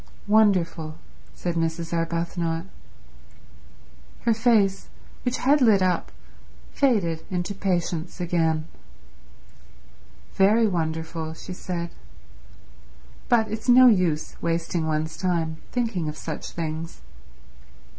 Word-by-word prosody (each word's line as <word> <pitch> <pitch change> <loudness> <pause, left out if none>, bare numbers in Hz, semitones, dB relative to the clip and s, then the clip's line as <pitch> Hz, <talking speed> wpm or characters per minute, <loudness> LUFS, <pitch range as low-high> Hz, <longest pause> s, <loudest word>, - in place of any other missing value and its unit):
"Wonderful," 185 -7 +2 0.4
said 175 - -2
Mrs. 165 0 -2
Arbuthnot. 170 0 -1 1.6
Her 230 - +3
face, 220 -4 +2 0.3
which 250 0 -1
had 285 +3 +3
lit 215 -6 +5
up, 180 -2 0 0.6
faded 195 - +1
into 180 +2 -2
patience 175 -3 -2
again. 165 -3 0 1.7
"Very 215 +4 +4
wonderful," 160 -3 -2
she 185 - -8
said. 170 -2 -4 1.4
"But 225 -4 +3
it's 220 +3 -4
no 255 +1 +8
use 180 -10 +3
wasting 165 0 -1
one's 155 0 -1
time 165 -4 -1
thinking 220 -10 -1
of 150 - -7
such 155 -2 -5
things." 160 - -5
175 Hz, 95 wpm, -25 LUFS, 165-205 Hz, 1.7 s, no